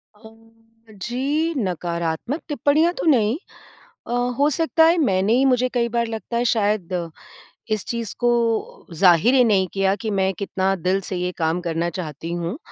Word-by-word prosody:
अम्म 225 Hz, +1 st, -20 dB
जी, 280 Hz, -, -1 dB
नकारात्मक 175 Hz, -, -2 dB
टिप्पणियाँ 305 Hz, +3 st, +2 dB
तो -, -, -3 dB
नहीं। 235 Hz, -7 st, +3 dB, 0.7 s
अ, -, -, -5 dB, 0.3 s
हो 285 Hz, +1 st, +4 dB
सकता 325 Hz, +1 st, +2 dB
है 330 Hz, +2 st, +5 dB
मैंने 195 Hz, -, +2 dB
ही 255 Hz, +3 st, +3 dB
मुझे 255 Hz, -1 st, +3 dB
कई 235 Hz, -1 st, +1 dB
बार 235 Hz, 0 st, 0 dB
लगता 225 Hz, +1 st, -5 dB
है 240 Hz, -, +1 dB
शायद 190 Hz, -6 st, -1 dB, 0.6 s
इस 215 Hz, -, -5 dB
चीज़ 235 Hz, -3 st, -4 dB
को 240 Hz, -, +2 dB, 0.7 s
ज़ाहिर 180 Hz, +7 st, +4 dB
ही 255 Hz, -2 st, +6 dB
नहीं 200 Hz, -5 st, +3 dB
किया 195 Hz, 0 st, +1 dB
कि 220 Hz, 0 st, -4 dB
मैं 190 Hz, -1 st, +1 dB
कितना 195 Hz, -1 st, -1 dB
दिल 185 Hz, +2 st, 0 dB
से 190 Hz, -, -3 dB
ये 180 Hz, 0 st, -1 dB
काम 165 Hz, +1 st, 0 dB
करना 170 Hz, -1 st, -2 dB
चाहती 165 Hz, -2 st, -6 dB
हूँ। 175 Hz, -, -3 dB
215 Hz, 165 wpm, -22 LUFS, 180-245 Hz, 0.7 s, ही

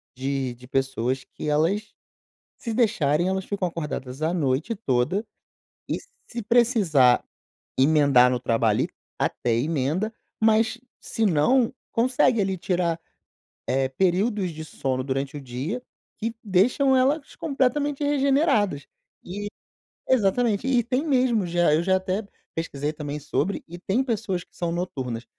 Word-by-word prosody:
de 135 Hz, -1 st, -2 dB
de 125 Hz, +1 st, -15 dB
pessoas 130 Hz, -1 st, -1 dB
que -, -, -8 dB
elas, 185 Hz, +8 st, +1 dB, 0.6 s
se 230 Hz, -3 st, -4 dB
deixarem, 175 Hz, -, +2 dB
elas 190 Hz, 0 st, -1 dB
ficam 195 Hz, -3 st, -1 dB
acordadas 150 Hz, -5 st, -5 dB
a 160 Hz, +3 st, +1 dB
noite 150 Hz, -, 0 dB
toda 180 Hz, -, 0 dB, 0.6 s
e, -, -, 0 dB, 0.3 s
se 235 Hz, -1 st, -5 dB
precisar 205 Hz, -, +4 dB, 0.6 s
emendar 140 Hz, -3 st, +5 dB
no 125 Hz, -, 0 dB
trabalho 115 Hz, -3 st, +2 dB
ali, -, -, -1 dB, 0.3 s
até 120 Hz, -, 0 dB
emenda, 155 Hz, -, 0 dB, 0.3 s
mas 220 Hz, +2 st, +3 dB, 0.2 s
se 225 Hz, -, -1 dB
não, 225 Hz, -, +3 dB, 0.2 s
consegue 245 Hz, -2 st, +3 dB
ali 190 Hz, -1 st, 0 dB
tirar, 170 Hz, -2 st, 0 dB, 0.7 s
eh, 135 Hz, 0 st, +1 dB
períodos 190 Hz, -, +1 dB
de 160 Hz, 0 st, -7 dB
sono 130 Hz, -4 st, -2 dB
durante 135 Hz, +2 st, -2 dB
o 145 Hz, -, -5 dB
dia 135 Hz, -, -4 dB, 0.4 s
que 225 Hz, +1 st, -3 dB
deixam 250 Hz, +8 st, +3 dB
elas 275 Hz, +3 st, +1 dB
completamente 285 Hz, -1 st, 0 dB
regeneradas, 275 Hz, -, +2 dB, 0.4 s
e 205 Hz, +3 st, -5 dB, 0.6 s
Exatamente! 230 Hz, -1 st, +2 dB
E 250 Hz, -3 st, +3 dB
tem 255 Hz, +6 st, -1 dB
mesmo 250 Hz, -8 st, +2 dB
já, 170 Hz, -3 st, +3 dB
eu 160 Hz, -, +3 dB
já 190 Hz, +1 st, +3 dB
até 190 Hz, +3 st, -1 dB, 0.3 s
pesquisei 150 Hz, -2 st, -2 dB
também 150 Hz, -1 st, -5 dB
sobre, 185 Hz, +6 st, -1 dB
e 175 Hz, +1 st, -9 dB
tem 215 Hz, +8 st, 0 dB
pessoas 210 Hz, -7 st, -2 dB
que -, -, -36 dB
são 170 Hz, -1 st, -2 dB
noturnas. 130 Hz, -10 st, -3 dB
180 Hz, 135 wpm, -25 LUFS, 140-230 Hz, 0.7 s, emendar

